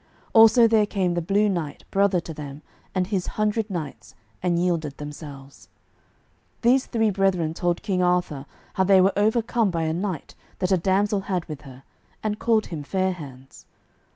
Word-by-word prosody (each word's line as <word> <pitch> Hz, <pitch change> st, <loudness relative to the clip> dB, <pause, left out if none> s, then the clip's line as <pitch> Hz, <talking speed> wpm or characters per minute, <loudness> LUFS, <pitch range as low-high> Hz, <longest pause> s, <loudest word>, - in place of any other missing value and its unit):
Also 225 Hz, +1 st, +7 dB
there 220 Hz, -2 st, +3 dB
came 185 Hz, -4 st, 0 dB
the 175 Hz, -, -1 dB
Blue 200 Hz, +5 st, +2 dB
Knight, 170 Hz, -7 st, -3 dB
brother 195 Hz, -2 st, +3 dB
to 165 Hz, -, -8 dB
them, 145 Hz, -1 st, -9 dB, 0.3 s
and 185 Hz, -1 st, +1 dB
his 190 Hz, -2 st, -2 dB
hundred 215 Hz, +1 st, 0 dB
knights, 150 Hz, -, -6 dB, 0.3 s
and 175 Hz, -1 st, +1 dB
yielded 170 Hz, -5 st, -1 dB
themselves. 145 Hz, -2 st, -10 dB, 0.9 s
These 255 Hz, +3 st, +3 dB
three 225 Hz, -3 st, +1 dB
brethren 185 Hz, -5 st, +1 dB
told 175 Hz, 0 st, -1 dB
King 185 Hz, -3 st, 0 dB
Arthur 180 Hz, -6 st, 0 dB, 0.3 s
how 190 Hz, -, +2 dB
they 190 Hz, 0 st, +5 dB
were 190 Hz, +1 st, +4 dB
overcome 220 Hz, +1 st, +1 dB
by 165 Hz, -2 st, -1 dB
a 160 Hz, 0 st, 0 dB
knight 180 Hz, -2 st, -4 dB, 0.2 s
that 185 Hz, 0 st, -1 dB
a 190 Hz, -, +5 dB
damsel 200 Hz, +3 st, +1 dB
had 180 Hz, -3 st, -1 dB
with 150 Hz, -3 st, -8 dB
her, 135 Hz, -2 st, -13 dB, 0.4 s
and 210 Hz, -1 st, -2 dB
called 225 Hz, -2 st, +2 dB
him 160 Hz, -4 st, -6 dB
Fair 190 Hz, +5 st, 0 dB
hands. 135 Hz, -6 st, -11 dB
185 Hz, 170 wpm, -24 LUFS, 160-205 Hz, 0.9 s, Also